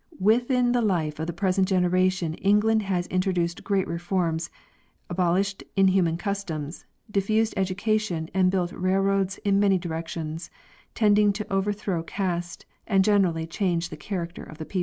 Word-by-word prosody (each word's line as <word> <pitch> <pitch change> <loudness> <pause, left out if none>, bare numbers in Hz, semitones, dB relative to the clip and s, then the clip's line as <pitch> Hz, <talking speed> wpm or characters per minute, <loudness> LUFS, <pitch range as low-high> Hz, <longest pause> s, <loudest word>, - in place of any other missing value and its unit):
Within 245 +4 +3
the 245 0 +2
life 165 -8 0
of 160 - -2
the - - -1
present 185 +2 +1
generation 185 -2 +1
England 210 +5 +3
has 185 -3 -1
in 185 0 0
troduced 175 -3 -1
great 195 -2 0
reforms, 170 -1 -1 0.6
abolished 185 +2 0
inhuman 185 -4 +3
customs, 175 -5 -4 0.3
diffused 215 +3 +1
ed 190 -1 +1
ucation, 195 -4 -1
and 185 -1 +3
built 180 -2 0
railroads 195 +1 +1
in 200 -1 +3
many 200 -2 +4
directions, 165 -1 -5 0.5
tending 210 -2 +4
to 210 +1 -5
over 195 +1 +1
throw 200 -4 -2
caste 175 -1 -3 0.2
and 195 -3 +4
gradually 185 -6 +2
change 175 0 -1
the - - -7
character 170 +2 -5
of 155 - -11
the 160 - -6
people. 190 - -3
185 Hz, 155 wpm, -25 LUFS, 170-200 Hz, 0.6 s, many